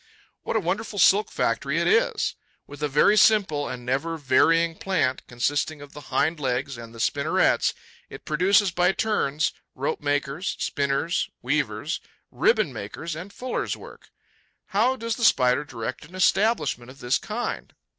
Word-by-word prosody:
What - - -4
a - - +4
wonderful 205 +4 -3
silk 200 +2 +5
factory - - -1
it - - 0
is! - - +2 0.3
With 145 0 -12
a 150 - +1
very 150 +9 +4
simple 195 -10 +3
and 125 -1 -7
never 145 +6 -1
varying 165 +4 +3
plant, 160 -9 0
consisting 145 +5 -1
of 145 0 -12
the 150 - -9
hind 160 +2 +1
legs 135 0 -2
and 115 -1 -10
the 115 - -12
spinnerets, - - +2 0.3
it - - -11
produces, 185 +5 +3
by 180 +2 +2
turns, 160 -9 0 0.2
rope 475 -3 -2
maker's, 145 +5 -1
spinner's, 140 +4 -1
weaver's, - - -1 0.3
ribbon 475 - +2
maker's 165 -1 -6
and 180 +5 -8
fuller's 250 +4 -3
work. - - -14 0.6
How 225 +6 +2
does 230 -3 -3
the 240 - -4
Spider 125 - +4
direct 130 -5 -6
an 175 +5 -14
establishment 185 - +1
of 130 - -13
this 120 -1 0
kind? 235 +3 -4
160 Hz, 155 wpm, -25 LUFS, 140-205 Hz, 0.6 s, silk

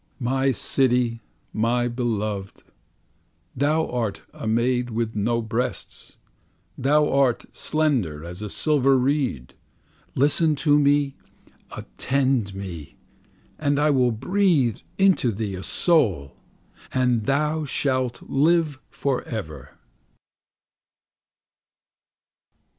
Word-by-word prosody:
My 135 +2 +1
City, 125 -2 +1 0.3
my 120 +2 +1
beloved, 110 -5 -3 0.9
Thou 150 +4 +1
art 115 -5 -3
a - - -6
maid 120 +2 +1
with 115 -1 -2
no 115 +3 0
breasts, 115 +3 -4 0.6
Thou 150 +3 +2
art 135 -3 +2
slender 120 - 0
as 90 +3 -7
a 105 - -5
silver 135 +1 +3
reed. 125 - -1 0.6
Listen 150 +3 +2
to 145 +1 +3
me, 145 -1 +2 0.6
attend 125 - -1
me! 90 -6 -8 0.6
And 145 -2 +1
I 150 +1 +3
will 125 -3 +3
breathe 145 - +1 0.2
into 190 -11 +3
thee 105 -1 -4
a 90 - -6
soul, 100 - +1 0.6
And 125 -4 +1
thou 150 +3 +1
shalt 130 -3 -1
live 155 0 +1
for 135 -3 -1
ever. 80 - -7
125 Hz, 95 wpm, -24 LUFS, 110-145 Hz, 0.9 s, silver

